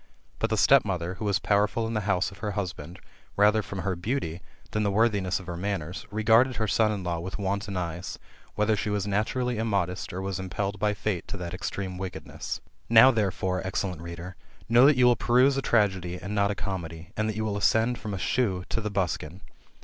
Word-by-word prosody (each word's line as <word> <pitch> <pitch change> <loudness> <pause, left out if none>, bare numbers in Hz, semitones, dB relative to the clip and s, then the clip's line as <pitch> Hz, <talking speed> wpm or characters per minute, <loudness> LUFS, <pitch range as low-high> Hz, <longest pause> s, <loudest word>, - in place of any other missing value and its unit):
But - - 0
the - - 0
stepmother, 90 -3 +3
who 110 - -3
was 100 -2 +2
powerful 105 +4 +1
in 115 - -3
the 105 -2 -2
house 95 0 +1
of 100 - -14
her 105 -1 -3
husband, 90 -4 -5 0.4
mther 105 +1 +4
from 95 0 -5
her 95 -1 -1
beauty, 90 - -3 0.3
than 105 - 0
the 105 - +1
worthiness 100 -3 +2
of 95 - -11
her 85 0 -5
manners, 90 -2 -4
regarded 115 +4 +4
her 110 -1 -1
son 110 +1 +3
in 100 -3 -3
law 85 -2 -2
with 95 +3 -5
wanton 100 0 -2
eyes, 85 0 -4 0.4
whether 105 +1 +2
she 105 +1 -2
was 105 -1 -1
naturally 110 +4 -1
immodest, 95 -5 -1
or 90 - -5
was 95 -1 -3
impelled 95 +2 -3
by 105 0 +1
Fate 105 -4 -2
to 100 - -5
that 85 -2 -5
extreme 95 0 -4
wickedness. 95 -1 -6 0.3
Now, 115 +3 +8
therefore, 95 -4 -1
excellent 95 -2 -3
reader, 85 +2 -7 0.3
know 120 +4 +7
that 145 -3 +5
you 125 - +5
will 120 0 +6
peruse 125 +4 +4
a 135 - 0
tragedy, 95 -7 +1
and 100 +3 -5
not 100 -1 +2
a 105 - -1
comedy, 85 -5 -5
and 110 0 0
that 110 - -3
you 110 0 -2
will 105 -2 -1
ascend 110 +5 +2
from 110 - -6
the 100 - -3
shoe 95 -2 0
to 115 - -1
the 105 - -2
buskin.' 95 -3 -2
100 Hz, 210 wpm, -27 LUFS, 90-110 Hz, 0.4 s, Now